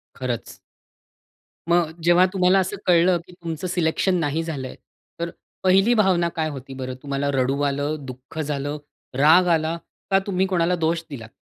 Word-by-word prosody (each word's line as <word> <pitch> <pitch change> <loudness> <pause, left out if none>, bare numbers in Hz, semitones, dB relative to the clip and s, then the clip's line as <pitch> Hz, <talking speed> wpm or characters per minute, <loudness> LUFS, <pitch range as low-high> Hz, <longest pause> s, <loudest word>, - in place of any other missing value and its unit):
खरंच. 125 -3 -4 1.1
मग 170 -2 +3
जेव्हा 175 +2 +5
तुम्हाला 185 0 +4
असं 190 +2 -1
कळलं, 175 0 +4
की - - -14
तुमचं 170 0 -5
सिलेक्शन 180 +2 +1
नाही 160 +1 -1
झालंय 140 -6 -5 0.4
तर 170 0 -2 0.3
पहिली 195 +5 +4
भावना 185 -6 +3
काय 160 -1 -1
होती 135 -1 -8
बरं? 130 -1 -5
तुम्हाला 140 0 -2
रडू 135 +1 0
आलं, 145 +2 0
दुःख 130 +5 -9
झालं, 145 0 -2 0.4
राग 160 +6 +6
आला 160 +1 -2 0.3
का? 195 - +5
तुम्ही 190 -1 +1
कोणाला 180 -1 +1
दोष 165 0 0
दिलात? 115 -6 -8
165 Hz, 150 wpm, -23 LUFS, 140-180 Hz, 1.1 s, राग